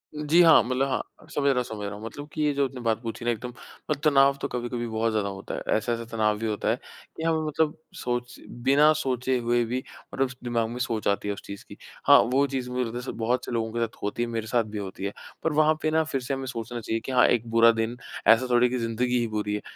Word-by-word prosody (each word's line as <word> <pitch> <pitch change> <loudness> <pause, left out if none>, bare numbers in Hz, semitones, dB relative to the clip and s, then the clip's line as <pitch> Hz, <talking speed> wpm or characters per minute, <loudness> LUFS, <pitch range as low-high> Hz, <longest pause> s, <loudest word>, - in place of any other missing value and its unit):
जी 150 +3 +4
हाँ, 165 -7 +8
मतलब 130 +3 0
हाँ 130 - -5
समझ 140 -1 -1
रहा 135 - +3
हूँ 125 - +2
समझ 110 -3 -6
रहा 100 0 -5
हूँ 105 +2 -9
मतलब 145 +5 -7
की 155 - -1
ये 145 - +2
जो 140 0 +2
आपने 130 -1 -9
बात 115 -1 0
पूछी 115 0 -6
ना 120 - +3
एकदम 120 +2 -5 0.5
तनाव 140 -2 +5
तो - - -1
कभी-कभी 120 -1 -3
बहुत 115 0 0
ज़्यादा 105 -2 0
होता 95 -1 -6
है। - - -5 0.2
ऐसा-ऐसा 115 +2 -2
तनाव 110 -2 +1
भी 115 - -3
होता 105 -2 -1
है - - +3 0.4
कि 160 - -5
हमें 165 -1 +2
मतलब 155 +1 0 0.2
सोच 120 0 -3
बिना 140 +5 +4
सोचे 130 -2 0
हुए 120 0 +1
भी 125 +3 -3 0.3
मतलब 135 -1 +1
दिमाग 120 -2 0
में 120 - -6
सोच 115 -3 -1
आती 100 0 0
है 100 - 0
उस - - -9
चीज़ 100 0 -8
की - - -12 0.3
हाँ - - +9 0.2
वो 140 +2 +4
चीज़ 130 -2 -3
मुझे 125 0 0
लगता 125 +3 -5
बहुत 120 +2 -1
से - - -6
लोगों 115 -2 -1
के 120 - -2
साथ 115 -1 -3
होती 105 +4 -1
है 120 - -3
मेरे 115 -1 -3
साथ 120 0 +2
भी 105 0 -7
होती 95 -1 -6
है। 100 - -3 0.3
पर 160 - +1
वहाँ 155 +1 +4
पे 155 - +1
ना 160 0 +3
फ़िर 145 -4 -3
से 125 +2 -3
हमें 135 0 -3
सोचना 120 -1 -5
चाहिए 115 0 -2
कि - - -4
हाँ 125 -1 +5
एक 120 -1 +1
बुरा 115 0 +7
दिन 115 +1 -2 0.3
ऐसा 120 +3 +6
थोड़ी 120 0 +5
है - - -6
की 125 - 0
ज़िंदगी 120 +2 0
ही 120 - 0
बुरी 105 -1 -2
है। 105 - -4
120 Hz, 265 wpm, -26 LUFS, 115-135 Hz, 0.5 s, हाँ